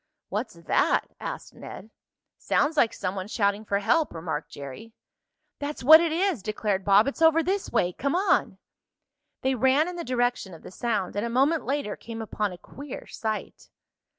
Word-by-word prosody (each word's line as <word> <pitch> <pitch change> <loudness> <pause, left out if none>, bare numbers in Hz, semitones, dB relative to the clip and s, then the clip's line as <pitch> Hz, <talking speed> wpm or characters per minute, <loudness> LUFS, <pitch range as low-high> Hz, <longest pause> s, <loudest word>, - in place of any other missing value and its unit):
"What's - - -3
that?" - - +1
asked - - -6
Ned. 215 +3 -10 0.5
"Sounds 295 +3 +1
like 235 -6 +4
some 185 - -3
one 190 -1 -5
shouting 205 -1 0
for 200 -2 0
help," 295 - +1
remarked 160 -2 -4
Jerry. 140 - -9 0.7
"That's 290 -2 -5
what 315 +5 +9
it 335 -2 0
is!" 345 - 0
declared 210 -1 -2
Bob. 200 +2 +5
"It's 275 +3 -4
over 325 0 +5
this 385 +3 -1
way. 180 0 +1
Come 280 - -1
on!" 385 +3 +2 0.9
They 265 +1 +2
ran 265 +5 +3
in 360 0 -5
the 340 - -4
direction 245 -7 -1
of 160 - -15
the - - -10
sound, 210 -3 -2
and 205 - -1
a 235 - -2
moment 275 +7 +2
later 275 -6 -2
came 230 0 -8
upon 210 -2 -2
a 180 - -9
queer 280 +9 -9
sight. 220 -1 -5
235 Hz, 180 wpm, -26 LUFS, 200-295 Hz, 0.9 s, what